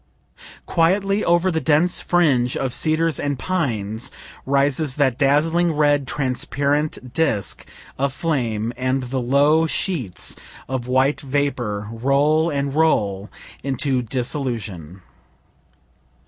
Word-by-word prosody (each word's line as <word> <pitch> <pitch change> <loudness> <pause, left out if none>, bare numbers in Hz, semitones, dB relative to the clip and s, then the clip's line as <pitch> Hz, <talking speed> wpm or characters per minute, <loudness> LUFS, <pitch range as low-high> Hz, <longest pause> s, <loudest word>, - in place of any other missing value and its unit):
Quietly 195 +5 +1
over 175 +2 +2
the 160 -1 -1
dense 160 +4 +2
fringe 135 -9 +2
of 130 -2 -2
cedars 160 0 +1
and 145 -1 -2
pines 115 - -2 0.4
rises 140 0 +1
that 135 -4 +2
dazzling, 160 +5 +2
red, 145 -2 +2
transparent 140 0 -1
disk 125 -10 0 0.3
of 140 0 +1
flame, 120 -8 -2
and 130 +1 -1
the 130 +1 -3
low 145 +6 +3
sheets 135 - -2 0.3
of 130 -2 -3
white 130 +3 +2
vapor 130 -7 -2
roll 140 +7 +2
and 140 -2 -2
roll 105 -11 +1 0.3
into 135 -1 -1
dissolution. 115 - -3
140 Hz, 105 wpm, -21 LUFS, 125-155 Hz, 0.4 s, low